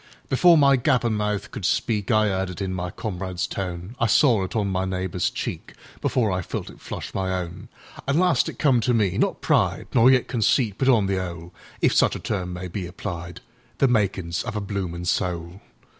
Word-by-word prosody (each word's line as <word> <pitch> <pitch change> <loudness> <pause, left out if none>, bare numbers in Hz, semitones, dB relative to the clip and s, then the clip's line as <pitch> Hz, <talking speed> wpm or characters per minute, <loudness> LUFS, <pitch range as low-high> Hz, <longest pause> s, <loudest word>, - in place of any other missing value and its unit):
Before 170 +6 +6
my 140 -2 +5
gappin' 120 -3 +2
mouth 105 -1 -2
could 120 - -6
speakI 110 +2 +1
'eard 95 0 -1
it 90 - -7
in 95 -2 -2
my 90 0 -3
comrade's 90 -2 -4
tone;I 95 +6 -3
saw 110 -2 +4
it 95 - -6
on 105 -3 +1
my 95 -1 0
neighbour's 95 -1 -1
cheekBefore 110 -6 -3
I 90 - -1
felt - - -5
it - - -17
flush - - -7
my 95 -1 -1
own. 90 0 -6 0.4
An' 140 +2 +2
last 180 0 +3
it - - -9
come 135 -5 +3
to 125 +1 +2
me—not 100 -4 +1
pride, - - +1
Nor 125 +1 +6
yet 130 -1 +4
conceit, 115 -2 +1
but 135 - +3
on 115 -6 +4
the 95 -1 0
'ole(If 85 -2 -3
such - - +3
a - - -5
term 90 -4 -3
may 90 +1 -5
be 90 0 -5
applied),The 90 +7 -4
makin's 95 -7 0
of - - -5
a - - 0
bloomin' 95 -4 -4
soul. 90 0 -2
100 Hz, 185 wpm, -24 LUFS, 90-115 Hz, 0.4 s, Before